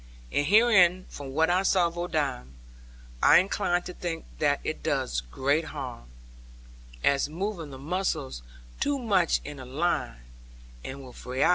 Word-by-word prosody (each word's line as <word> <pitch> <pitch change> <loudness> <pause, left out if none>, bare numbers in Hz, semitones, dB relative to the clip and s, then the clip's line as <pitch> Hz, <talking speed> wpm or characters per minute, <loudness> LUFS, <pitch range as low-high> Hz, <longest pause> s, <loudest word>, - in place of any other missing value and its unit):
And 145 - +1
herein, 185 -4 +5
from 140 -2 -8
what 160 +4 +2
I 180 +1 +3
saw 190 -2 +3
of 170 0 -3
Odam, 145 - -2 0.7
I - - +8
incline 180 -1 +1
to 180 - -7
think 170 -2 -4
that - - +2
it - - -3
does - - -1
great 140 - 0
harm; 130 - -7 0.9
as 140 +1 +2
moving 175 -1 -4
the 135 - -9
muscles 150 - -2 0.4
too 285 0 +1
much 200 - +2
in 145 -1 -7
a 130 - -8
line, 135 - -1 0.6
and 135 +1 -7
without 125 - -12
variety. 130 +5 +1
160 Hz, 150 wpm, -27 LUFS, 135-180 Hz, 0.9 s, I